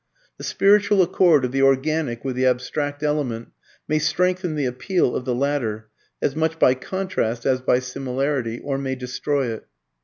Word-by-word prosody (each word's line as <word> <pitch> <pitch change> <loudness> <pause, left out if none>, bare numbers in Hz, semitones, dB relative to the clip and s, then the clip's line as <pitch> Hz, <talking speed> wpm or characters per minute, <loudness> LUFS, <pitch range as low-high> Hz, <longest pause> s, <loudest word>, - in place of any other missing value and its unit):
The - - -8
spiritual 205 -1 +4
accord 170 -6 +4
of 125 - -3
the 135 +1 0
organic 135 -2 +1
with 130 -2 -2
the 130 +1 +2
abstract 145 +3 -1
element 140 -7 -1 0.4
may 155 0 +1
strengthen 180 +2 0
the 145 -2 -1
appeal 130 +4 0
of 125 - -3
the 125 - 0
latter 120 -6 -2 0.3
(as 140 - 0
much 160 +1 0
by 130 - +5
contrast 130 -6 -3
as 130 -1 +2
by 125 -1 +3
similarity) 130 -1 -2
or 135 -1 -2
may 135 -1 -2
destroy 130 +1 -2
it. 110 - -10
135 Hz, 165 wpm, -22 LUFS, 125-155 Hz, 0.4 s, by